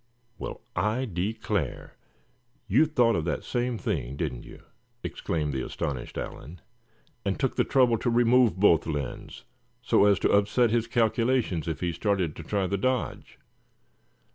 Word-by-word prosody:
"Well, - - -6
I 105 +8 0
declare, 105 +2 -3 0.7
you 125 +10 +4
thought 120 -6 +3
of 80 - 0
that 85 - -2
same 120 -1 -1
thing, 70 - -3
didn't 70 -7 -3
you?" - - -13 0.4
exclaimed 75 -3 -2
the 65 - -2
astonished 65 -4 -4
Allan; 80 +7 -7 0.6
"and 100 -1 -2
took 135 -2 0
the - - +3
trouble 125 -4 +3
to 120 - 0
remove 120 -2 +4
both 85 -6 +4
lens, 75 -5 -5 0.4
so 100 - +4
as 100 -2 +5
to - - +2
upset 105 +4 +3
his 115 -1 +1
calculations 115 - +1
if 80 - -3
he 90 -1 0
started 90 -2 -1
to - - -8
try 100 +4 -1
the 100 +1 -1
dodge. 130 +3 -2
105 Hz, 150 wpm, -27 LUFS, 85-120 Hz, 0.7 s, as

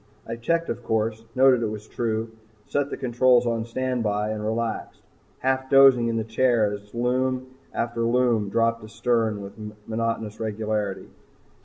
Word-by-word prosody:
I - - -4
checked 165 +8 0
the - - -1
course, 110 0 -2
noted 130 -2 +5
it 115 - 0
was 105 0 -6
true, 110 -1 -2 0.3
set 145 0 -1
the - - -5
controls 125 0 +3
on 115 -1 -1
standby 115 -4 -1
and 105 -1 -4
relaxed, 110 +1 -3 0.4
half 130 0 0
dozing 135 -3 +6
in 115 - -1
the 110 - 0
chair 115 -2 +2
as 105 +2 -10
Lume 130 +1 0 0.2
after 120 0 -2
Lume 115 -3 +2
dropped 115 +1 +1
astern 110 0 0
with 100 0 -8 0.3
monotonous 115 -1 -2
regularity. 105 -2 -2
115 Hz, 150 wpm, -25 LUFS, 110-125 Hz, 0.4 s, dozing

